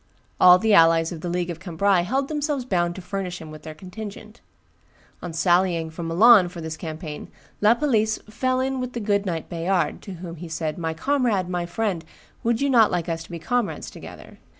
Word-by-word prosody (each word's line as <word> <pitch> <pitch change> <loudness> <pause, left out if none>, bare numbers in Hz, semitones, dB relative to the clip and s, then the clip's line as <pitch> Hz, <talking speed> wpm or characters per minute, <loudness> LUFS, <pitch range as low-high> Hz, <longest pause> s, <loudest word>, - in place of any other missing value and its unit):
All 180 0 +8
the 220 +2 +2
allies 165 -2 +5
of 165 -3 -7
the 175 - -4
League 175 0 -1
of 165 - -8
Cambrai 185 +1 +1
held 265 +10 -1
themselves 295 -3 -2
bound 175 -6 0
to 190 - -8
furnish 180 -1 -4
him 160 -1 -10
with 155 -1 -10
their 155 0 -9
contingent. 210 +5 -9 0.8
On 175 - -5
sallying 175 -1 +1
from 165 +1 -6
Milan 190 +2 +6
for 175 -1 -9
this 160 -1 -5
campaign, 155 -1 -7 0.3
La 215 +3 +5
Palisse 220 -6 +1
"fell 255 +4 -1
in 265 0 -1
with 250 0 -4
the 240 - -3
good 205 -2 0
knight 165 -3 -3
Bayard, 175 +2 -1
to 195 - -8
whom 170 -1 -8
he 175 +2 -8
said, 160 0 -3
'My 160 -1 -2
comrade, 235 - 0
my 175 -1 -2
friend, 185 -2 -2 0.4
would 230 +1 +1
you 280 - +2
not 230 -4 +6
like 175 -1 -2
us 165 0 -2
to - - -19
be 170 - -5
comrades 200 -1 -2
together? - - -12
180 Hz, 205 wpm, -24 LUFS, 165-220 Hz, 0.8 s, All